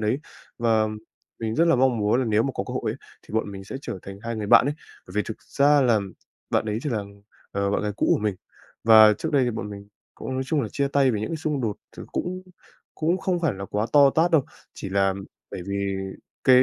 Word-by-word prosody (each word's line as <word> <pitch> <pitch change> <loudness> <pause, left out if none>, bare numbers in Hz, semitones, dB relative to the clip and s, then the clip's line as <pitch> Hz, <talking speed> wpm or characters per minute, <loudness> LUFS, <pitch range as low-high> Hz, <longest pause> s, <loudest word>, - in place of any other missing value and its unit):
đấy. 110 +5 +1 0.4
Và 110 -2 +3 0.5
mình 110 -1 -2
rất 165 - +4
là 165 - +5
mong 125 -2 +3
muốn 105 +3 +2
là - - 0
nếu 110 0 +3
mà 135 - -1
có - - -2
cơ - - -7
hội - - -1
ấy - - -5 0.3
thì - - -11
bọn 110 -2 0
mình 95 0 -8
sẽ 115 - -6
trở 95 - -5
thành 100 0 -9
hai 115 0 -3
người 105 -1 -3
bạn 115 - +7
ấy 145 - 0 0.3
bởi 90 - -12
vì 105 - +2
thực 110 - -7
ra 145 +1 +3
làm 110 -7 +2 0.4
bạn - - +2
ấy 105 +1 -1
chỉ 150 - -2
là, 110 -4 -1 0.5
ờ, 100 0 0
bạn 100 - 0
gái 105 -1 -1
cũ - - +1
của - - 0
mình. 105 -2 0 0.5
Và 110 -1 +8
trước - - -3
đây 140 -3 +4
thì 120 - 0
bọn 105 -2 -5
mình 100 0 -9 0.3
cũng - - -6
nói 130 - -1
chung 150 0 +1
là 110 - -3
chia 140 -1 0
tay 140 -2 +3
về 105 - -1
những 110 - -3
cái 165 - -2
xung 150 -3 -2
đột 110 -4 -2 0.2
thì - - -7
cũng 185 +1 -3 0.5
cũng 170 +4 0
không 185 -2 -1
phải 160 - +1
là 100 0 -6
quá 105 +2 -1
to 140 -2 +7
tát 165 +4 +2
đâu, 160 -6 +4 0.3
chỉ - - -6
là 95 0 +2 0.4
bởi - - -6
vì 100 0 -2 0.5
cái 130 -1 +7
115 Hz, 255 wpm, -25 LUFS, 105-140 Hz, 0.5 s, Và